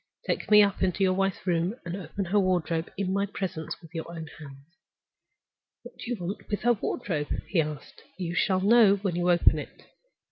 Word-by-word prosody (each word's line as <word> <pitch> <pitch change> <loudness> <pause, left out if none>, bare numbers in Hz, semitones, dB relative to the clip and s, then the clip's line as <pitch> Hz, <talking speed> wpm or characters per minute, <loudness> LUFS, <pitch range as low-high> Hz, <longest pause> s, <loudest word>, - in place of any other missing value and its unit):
Take - - -2
me 210 -1 +8
up 200 -1 0
into 190 +1 +1
your 185 -1 +3
wife's 195 0 -1
room, 175 +3 0
and 170 +1 -4
open 195 0 -5
her 200 +4 +2
wardrobe 175 -3 0
in 190 -1 -1
my 200 +1 0
presence 180 -5 -5
with 165 +1 -15
your 165 -1 -5
own 165 -2 -6
hands." 140 -2 -12 1.2
"What - - -13
do - - -7
you 245 - -1
want 195 +3 -6
with 205 - -2
her 240 +1 +4
wardrobe?" 180 -8 -3 0.2
he 175 - +2
asked. 150 -2 -7 0.2
"You 175 -2 -3
shall 185 +1 +2
know 210 0 +6
when 195 -3 -2
you 175 0 +1
open 175 -1 +4
it." - - -10
185 Hz, 200 wpm, -27 LUFS, 170-200 Hz, 1.2 s, me